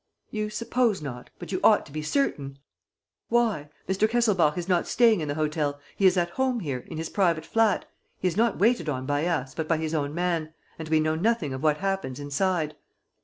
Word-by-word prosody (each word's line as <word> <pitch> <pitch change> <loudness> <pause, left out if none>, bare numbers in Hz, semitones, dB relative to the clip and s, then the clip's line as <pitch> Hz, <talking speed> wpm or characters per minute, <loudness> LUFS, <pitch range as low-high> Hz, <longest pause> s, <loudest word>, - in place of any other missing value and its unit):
"You 215 -1 -2
suppose 230 0 0
not? 125 -5 -7
But - - -8
you - - -1
ought - - +5
to - - -15
be 155 +2 -4
certain." 150 - -1 0.7
"Why? 225 -11 +1 0.2
Mr. 195 +3 +2
Kesselbach 205 -10 +2
is 175 0 -3
not 180 -2 +1
staying 230 -6 +4
in 155 - -3
the 145 - -2
hotel; 150 -2 -1 0.2
he 195 - +4
is 185 0 +3
at 175 -1 +1
home 260 +1 0
here, 140 -6 -3
in - - -7
his 160 0 -3
private 170 -5 +1
flat. 225 -2 +2 0.3
He 185 - -1
is 170 - -1
not 230 0 +2
waited 210 -7 +2
on 130 -2 -3
by 145 +4 0
us, 140 -7 -1
but 160 -1 -3
by 165 - +2
his 160 0 -3
own 145 -1 -1
man; 170 -3 -1 0.2
and 160 -1 -6
we 160 0 +4
know 155 0 +1
nothing 170 - 0
of 130 - -5
what 150 -1 +2
happens 195 -9 -2
inside." 155 +2 -1
165 Hz, 215 wpm, -26 LUFS, 150-205 Hz, 0.7 s, ought